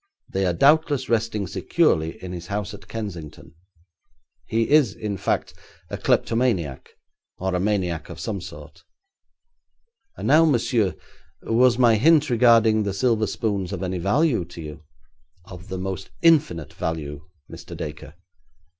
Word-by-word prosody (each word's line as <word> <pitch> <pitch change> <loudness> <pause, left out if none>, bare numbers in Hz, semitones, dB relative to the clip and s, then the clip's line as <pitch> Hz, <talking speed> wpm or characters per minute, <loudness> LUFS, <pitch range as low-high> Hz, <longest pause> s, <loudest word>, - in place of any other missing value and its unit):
They 95 0 0
are 90 - +1
doubtless 145 - +3
resting 115 -3 0
securely 80 -2 0
in 90 - -6
his 85 -1 -7
house 105 +1 -3
at 100 -3 -12
Kensington. 85 -8 -7 0.9
He 115 0 0
is, 145 -9 +4
in 105 -2 -4
fact, - - -2 0.4
a - - -3
kleptomaniac, 105 - 0 0.4
or 95 0 -2
a 90 - 0
maniac 95 -4 -1
of - - -9
some 100 -4 -4
sort. - - -11 1.4
And - - -4
now, 155 +4 +6
monsieur, 120 - +1 0.5
was 120 +1 +3
my 120 -3 +5
hint 150 +3 +4
regarding 115 -2 +5
the 100 -2 -2
silver 110 -1 +1
spoons 100 -5 -2
of 95 -1 -4
any 90 -1 -2
value 115 - +2
to 85 0 -12
you?' 75 0 -9 0.6
'Of 90 -1 -11
the 95 - -5
most 95 0 -5
infinite 150 - +3
value, 75 -3 -4 0.3
Mr. - - -10
Dacre.' 75 -1 -7
100 Hz, 140 wpm, -23 LUFS, 90-120 Hz, 1.4 s, now